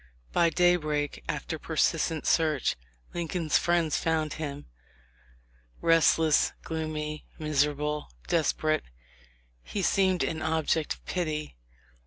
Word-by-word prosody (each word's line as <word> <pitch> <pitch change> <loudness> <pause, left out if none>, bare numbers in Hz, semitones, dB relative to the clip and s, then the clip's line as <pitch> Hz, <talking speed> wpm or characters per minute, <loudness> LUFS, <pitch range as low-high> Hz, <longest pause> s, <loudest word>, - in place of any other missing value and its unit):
By 170 - +4
daybreak, 155 -4 +1
after - - -3
persistent 160 -2 0
search, 155 -5 +2 0.4
Lincoln's 170 -2 0
friends 170 -3 +2
found 160 -2 0
him. 145 -2 -5 1.1
Restless, 165 -2 +4
gloomy, 155 -1 -4
miserable, 150 0 0 0.2
desperate, 155 -2 +1 0.8
he 200 - -4
seemed 190 -1 +3
an 160 -1 -2
object 160 -1 0
of - - -26
pity. 155 - -3
155 Hz, 95 wpm, -28 LUFS, 150-165 Hz, 1.1 s, By